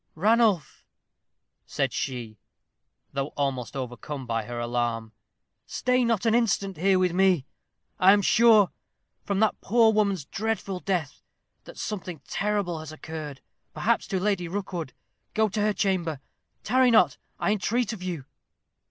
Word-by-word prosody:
"Ranulph," 210 - +2 0.8
said - - -1
she, 120 -6 -4 0.7
though 135 0 -1
almost 135 -5 -2
overcome 130 +2 -5
by 115 -2 -2
her 120 +1 -5
alarm, 120 -2 -2 0.6
"stay 250 0 +1
not 230 -4 +1
an 225 - +3
instant 200 -5 +1
here 190 +3 +3
with 180 -2 +2
me. 185 -6 +3 0.5
I 185 +1 +7
am 205 0 +4
sure, 220 -2 +5 0.5
from 200 -1 -1
that 220 - +2
poor 225 0 +4
woman's 200 -7 +1
dreadful 200 -2 -3
death, 175 -7 -2 0.4
that - - -12
something 180 -6 -5
terrible 200 -5 -1
has 155 -1 -8
occurred, 155 -3 -7 0.3
perhaps - - +1
to 190 - -1
Lady 190 -3 0
Rookwood. 175 -5 -4 0.4
Go 220 0 +3
to 210 +2 -2
her 210 0 +3
chamber. 180 -8 0 0.4
Tarry 255 +3 +4
not, 200 -10 +4 0.2
I - - +1
entreat 220 +3 0
of 205 - -8
you." 175 -7 -4
185 Hz, 140 wpm, -26 LUFS, 145-210 Hz, 0.8 s, I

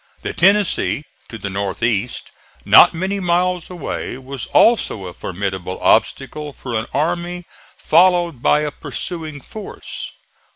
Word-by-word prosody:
The - - -3
Tennessee, 195 -5 +2 0.3
to 115 - -7
the 100 -2 -5
north 100 +2 -3
east, 115 0 -1 0.3
not - - +8
many 190 +4 -2
miles 180 -1 0
away, 170 -7 -5
was 135 -2 -7
also 210 - +3
a 90 - -7
formidable 95 -1 -4
obstacle 150 -1 +1
for 125 -3 -7
an 110 +1 -1
army 175 +3 -2 0.3
followed 175 -4 +3
by 150 - +3
a 150 -1 -2
pursuing 155 -2 -5
force. 215 +7 -8
150 Hz, 130 wpm, -19 LUFS, 115-180 Hz, 0.3 s, not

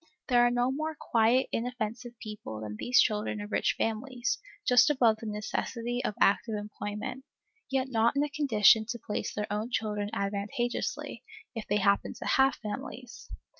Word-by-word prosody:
There 245 -1 +5
are 240 - +5
no 245 +1 +1
more 310 +3 -3
quiet, 235 +3 +3
inoffensive 240 0 -3
people 210 - -7
than 105 -1 -5
these 245 - +3
children 210 -1 +1
of 205 +1 -7
rich - - +1
families, 245 - -1 0.3
just 250 +3 +6
above 240 -6 +4
the 220 - -7
necessity 230 +3 -3
of 210 - -2
active 215 +2 +3
employment, 210 +4 -5 0.5
yet 265 -1 0
not 235 0 +2
in 280 - +3
a 295 - -2
condition 220 -7 +4
to 235 +1 -3
place 210 -2 -4
their 210 - -2
own 215 +3 -2
children 210 -3 -1
advantageously, 200 +4 -3 0.3
if 225 -3 -6
they 205 - +2
happen 200 0 +2
to - - -8
have 270 0 +4
families. 240 +4 -7
225 Hz, 165 wpm, -29 LUFS, 210-250 Hz, 0.5 s, just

